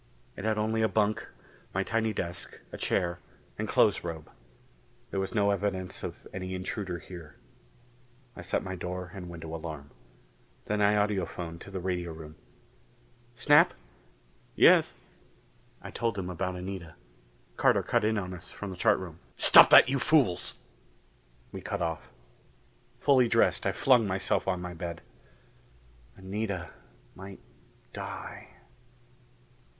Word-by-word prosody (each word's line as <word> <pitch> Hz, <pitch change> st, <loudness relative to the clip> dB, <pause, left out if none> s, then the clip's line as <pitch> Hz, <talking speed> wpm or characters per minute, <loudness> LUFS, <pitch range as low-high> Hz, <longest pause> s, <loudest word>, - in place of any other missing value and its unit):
It 100 Hz, -, -6 dB
had 110 Hz, -1 st, +1 dB
only 110 Hz, +1 st, 0 dB
a 110 Hz, -, +4 dB
bunk, 110 Hz, 0 st, 0 dB, 0.5 s
my 95 Hz, -, +1 dB
tiny 110 Hz, +1 st, 0 dB
desk, 85 Hz, -4 st, -5 dB
a -, -, -7 dB
chair 85 Hz, 0 st, 0 dB, 0.4 s
and -, -, -2 dB
clothes -, -, +3 dB
robe. 80 Hz, -3 st, -6 dB, 0.8 s
There 100 Hz, -, -1 dB
was 95 Hz, +4 st, -3 dB
no 100 Hz, -2 st, +3 dB
evidence 95 Hz, -2 st, -2 dB
of -, -, -7 dB
any 95 Hz, 0 st, -4 dB
intruder 95 Hz, 0 st, -4 dB
here. 85 Hz, -4 st, -11 dB, 1.0 s
I -, -, -8 dB
set 90 Hz, -, -1 dB
my 95 Hz, -1 st, -5 dB
door 90 Hz, 0 st, -5 dB
and 90 Hz, -3 st, -8 dB
window 80 Hz, -1 st, -8 dB
alarm. 80 Hz, -3 st, -7 dB, 0.7 s
Then 105 Hz, 0 st, -1 dB
I 105 Hz, +1 st, +4 dB
audiphoned 90 Hz, -5 st, -1 dB
to -, -, -10 dB
the 95 Hz, -1 st, -5 dB
radio 90 Hz, -2 st, -2 dB
room. 80 Hz, -1 st, -10 dB, 1.0 s
"Snap?" 150 Hz, +7 st, +5 dB, 0.8 s
"Yes." -, -, +6 dB, 0.9 s
I -, -, -8 dB
told 115 Hz, -3 st, -2 dB
him 90 Hz, -1 st, -3 dB
about 90 Hz, +1 st, -3 dB
Anita. 90 Hz, -3 st, -7 dB, 0.6 s
Carter -, -, +3 dB
cut -, -, +1 dB
in 110 Hz, +1 st, +1 dB
on 90 Hz, -2 st, -3 dB
us 90 Hz, -1 st, -10 dB
from 100 Hz, -2 st, -7 dB
the 90 Hz, -, -8 dB
chart -, -, +4 dB
room. 85 Hz, -3 st, -8 dB, 0.2 s
"Stop -, -, +9 dB
that, -, -, +9 dB
you 135 Hz, +1 st, 0 dB
fools!" 140 Hz, -, +2 dB, 1.0 s
We 95 Hz, -, -7 dB
cut 100 Hz, +1 st, -3 dB
off. 80 Hz, -2 st, -4 dB, 0.9 s
Fully 130 Hz, -4 st, +4 dB
dressed, -, -, +2 dB
I -, -, +2 dB
flung 125 Hz, -5 st, +4 dB
myself 95 Hz, 0 st, -1 dB
on 90 Hz, -2 st, -1 dB
my 90 Hz, 0 st, -5 dB
bed. 85 Hz, 0 st, -6 dB, 1.2 s
Anita 95 Hz, -1 st, -4 dB, 0.4 s
might 95 Hz, 0 st, -10 dB, 0.5 s
die.... -, -, -7 dB
95 Hz, 140 wpm, -29 LUFS, 85-105 Hz, 1.2 s, Stop